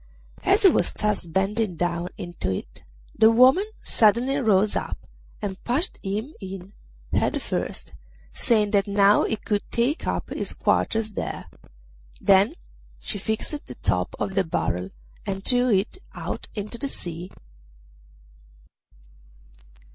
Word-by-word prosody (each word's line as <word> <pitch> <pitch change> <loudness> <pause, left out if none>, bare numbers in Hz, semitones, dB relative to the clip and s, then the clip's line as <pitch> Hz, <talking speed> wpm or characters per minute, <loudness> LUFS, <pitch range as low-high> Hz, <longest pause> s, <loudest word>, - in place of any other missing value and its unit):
As 395 +4 +3
he 385 - +9
was - - +2
thus 210 -4 -1
bending 195 +3 0
down 175 +1 -1
into 175 - -4
it 95 -10 -5 0.3
the 220 - +7
woman 260 - +6 0.2
suddenly 240 +5 +3
rose 210 -5 +3
up - - -2 0.5
and 190 -2 -4
pushed 280 +10 -1
him 215 +9 -3
in 190 0 -8 0.4
head - - +2
first, - - -4 0.4
saying 210 -3 +2
that 200 -1 +3
now 200 0 +5
he - - 0
could 210 -1 -1
take 245 +7 0
up - - -2
his - - -4
quarters 220 -1 +1
there. - - -4 0.7
Then 200 - +4 0.4
she 205 - -4
fixed 220 +9 -3
the - - -7
top - - -1
on 195 - -2
the 195 0 +2
barrel 90 - -1 0.4
and 195 0 -3
threw 250 0 +4
it 210 - +1 0.2
out - - -5
into 210 +3 -5
the 280 - -2
sea. 175 -5 -6
210 Hz, 130 wpm, -25 LUFS, 190-235 Hz, 0.7 s, he